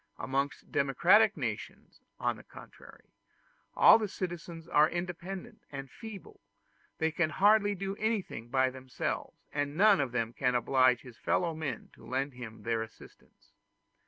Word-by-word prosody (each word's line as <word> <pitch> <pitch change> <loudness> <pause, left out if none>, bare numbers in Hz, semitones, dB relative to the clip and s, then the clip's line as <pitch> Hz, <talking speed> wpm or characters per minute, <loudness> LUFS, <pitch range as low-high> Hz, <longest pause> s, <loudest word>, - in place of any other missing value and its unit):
Amongst 140 +1 -2
democratic 180 - +4
nations, - - -6 0.2
on - - 0
the - - -13
contrary, - - -15 0.6
all - - +8
the 215 - -1
citizens 170 -3 -6
are 150 0 +4
independent 180 +5 -5
and 135 -2 -7
feeble; 220 -4 -10 0.6
they 160 0 +1
can 160 0 +1
do - - -9
hardly 205 0 +4 0.2
anything 210 - -2
by 130 0 +2
themselves, 130 0 -4 0.2
and 145 +1 -2
none 205 -2 +6
of 135 -3 -2
them 115 -2 -1
can 125 0 0
oblige 125 0 +3
his 120 -3 -14
fellow 170 +7 0
men 155 -6 -5
to - - -18
lend 135 +2 -2
him 120 -3 -9
their 115 -1 0
assistance. 110 0 -13
150 Hz, 145 wpm, -31 LUFS, 130-185 Hz, 0.6 s, all